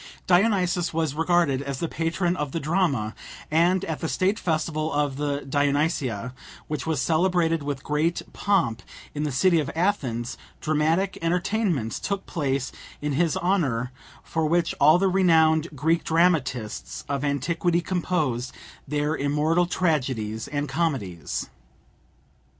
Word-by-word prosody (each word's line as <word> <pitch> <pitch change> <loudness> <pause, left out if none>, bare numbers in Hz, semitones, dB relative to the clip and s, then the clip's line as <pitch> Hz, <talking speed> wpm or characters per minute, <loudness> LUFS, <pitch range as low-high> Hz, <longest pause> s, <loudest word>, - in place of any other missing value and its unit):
Dionysus 180 -3 +2
was 160 -4 0
regarded 165 -4 +2
as 140 -1 -4
the 170 - -2
patron 170 +3 -1
of 150 -5 -3
the 165 - -1
drama, 150 - 0 0.4
and 175 +4 +3
at 160 -2 -3
the 160 - -2
state 195 +4 +1
festival 155 -1 -1
of 145 -2 0
the 145 -1 -1
Dionysia, 140 - 0 0.3
which 150 -3 -4
was 160 -4 0
celebrated 165 0 +2
with 140 -2 -4
great 155 +3 0
pomp 170 - +1 0.3
in 150 +1 -2
the 150 - -1
city 170 +6 +3
of 150 - -2
Athens, 135 - -1 0.2
dramatic 160 +5 +1
entertainments 175 - 0
took 200 -1 -3
place 135 -4 -2 0.3
in 150 0 -2
his 165 +2 +1
honour, 140 -10 0 0.3
for 160 -1 -1
which 170 +1 +1
all 150 +4 +7
the 195 +2 +2
renowned 165 -4 +4
Greek 160 +5 +1
dramatists 150 -10 0
of 140 -1 -2
antiquity 165 +5 +1
composed 160 -9 -1 0.4
their 150 +2 0
immortal 150 +5 +1
tragedies 130 - -1
and 145 0 -2
comedies. 135 - -2
155 Hz, 135 wpm, -25 LUFS, 140-175 Hz, 0.4 s, all